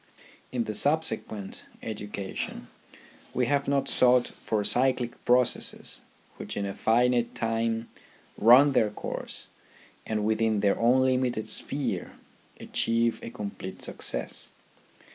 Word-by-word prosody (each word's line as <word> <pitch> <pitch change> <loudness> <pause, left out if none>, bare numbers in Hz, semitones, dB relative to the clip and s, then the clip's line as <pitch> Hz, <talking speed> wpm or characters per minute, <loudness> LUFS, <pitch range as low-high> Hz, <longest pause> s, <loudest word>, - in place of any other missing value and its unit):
In 125 -2 -1
the 110 - -4
subsequent 110 -8 +1 0.2
education 105 -3 -5 0.7
we 125 - +2
have 140 +3 0
not 140 0 +1
sought 125 -1 +4
for 105 -2 -3
cyclic 125 +1 0
processes 125 0 +1 0.4
which - - -7
in 100 - -1
a 100 - -4
finite 120 +2 +2
time 115 0 -1 0.5
run 125 +6 +7
their 110 -5 +3
course 105 - -6 0.6
and 105 -1 -1
within 110 -1 +1
their 100 -1 +2
own 125 +3 +4
limited 125 -3 0
sphere - - -4 0.5
achieve 115 0 0
a - - -6
complete 100 -5 -7
success. - - +1
115 Hz, 115 wpm, -27 LUFS, 110-125 Hz, 0.7 s, run